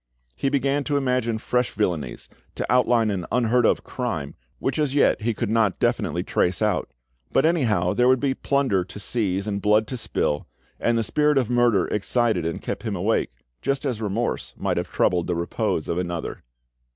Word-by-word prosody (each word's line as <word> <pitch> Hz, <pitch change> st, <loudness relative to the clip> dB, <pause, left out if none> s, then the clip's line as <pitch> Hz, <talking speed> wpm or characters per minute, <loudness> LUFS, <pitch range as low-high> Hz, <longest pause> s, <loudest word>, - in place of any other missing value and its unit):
He 135 Hz, -, 0 dB
began 140 Hz, +1 st, +1 dB
to 145 Hz, -1 st, +1 dB
imagine 125 Hz, -4 st, 0 dB
fresh 125 Hz, +2 st, 0 dB
villanies, 85 Hz, -, -2 dB, 0.3 s
to -, -, -2 dB
outline 120 Hz, -3 st, +3 dB
an 90 Hz, -3 st, -3 dB
unheard 120 Hz, 0 st, +3 dB
of -, -, +1 dB
crime, 95 Hz, -, -4 dB, 0.2 s
which 135 Hz, +3 st, -2 dB
as 145 Hz, -2 st, 0 dB
yet 145 Hz, -, +3 dB
he 115 Hz, 0 st, 0 dB
could 110 Hz, -1 st, -2 dB
not 110 Hz, -4 st, +2 dB
definitely -, -, 0 dB
trace 90 Hz, 0 st, 0 dB
out; 105 Hz, -, 0 dB, 0.4 s
but -, -, +3 dB
anyhow 110 Hz, -, +2 dB
there 125 Hz, 0 st, +3 dB
would 130 Hz, 0 st, +4 dB
be 140 Hz, 0 st, +1 dB
plunder 135 Hz, -10 st, +1 dB
to 95 Hz, +3 st, -10 dB
seize 100 Hz, -3 st, -1 dB
and 100 Hz, -2 st, -2 dB
blood 105 Hz, +2 st, +3 dB
to 130 Hz, -, -5 dB
spill, 75 Hz, -9 st, -1 dB, 0.3 s
and 120 Hz, 0 st, +1 dB
the 115 Hz, -, +1 dB
spirit 150 Hz, +6 st, +2 dB
of 125 Hz, -3 st, +1 dB
murder 120 Hz, -6 st, +3 dB
excited 105 Hz, -4 st, +1 dB
and 85 Hz, -, -4 dB
kept -, -, -4 dB
him 110 Hz, -3 st, -3 dB
awake, 100 Hz, +5 st, +1 dB, 0.3 s
just 140 Hz, +1 st, -1 dB
as 120 Hz, -5 st, -2 dB
remorse 110 Hz, +3 st, -2 dB
might -, -, -1 dB
have -, -, -3 dB
troubled 90 Hz, -2 st, +1 dB
the 90 Hz, -, 0 dB
repose 85 Hz, 0 st, -1 dB
of 85 Hz, -, -1 dB
another. 85 Hz, -2 st, -4 dB
115 Hz, 190 wpm, -24 LUFS, 95-125 Hz, 0.4 s, would